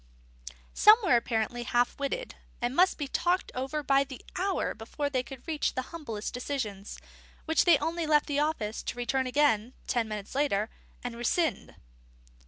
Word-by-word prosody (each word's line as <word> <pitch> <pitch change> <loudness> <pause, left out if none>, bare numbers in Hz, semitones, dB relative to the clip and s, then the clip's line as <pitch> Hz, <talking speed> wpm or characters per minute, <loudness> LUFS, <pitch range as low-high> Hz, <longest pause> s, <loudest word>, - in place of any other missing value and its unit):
Some 425 +1 +8
were 345 -10 +4
apparently 235 0 0
half 240 +1 +1
witted, 485 - -3 0.3
and 240 +2 -1
must 365 +3 +4
be 290 - -3
talked 355 +6 0
over 270 +4 -3
by 275 0 +4
the 265 -2 -11
hour 385 +1 0
before 285 +6 -4
they 255 -2 +1
could 255 +2 -11
reach 310 -2 -1
the 255 - -1
humblest 230 -11 -5
decision, 250 -6 -3 0.6
which 320 0 +3
they 340 -4 +7
only 325 +3 -2
left 300 -1 +4
the 290 -1 -1
office 295 -8 -1
to - - -5
return 255 +2 0
again 255 -4 +2
(ten 235 -2 0
minutes 210 -2 -6
later) 235 -7 +1 0.3
and 245 -1 -4
rescind. 240 - -1
270 Hz, 165 wpm, -29 LUFS, 240-305 Hz, 0.6 s, Some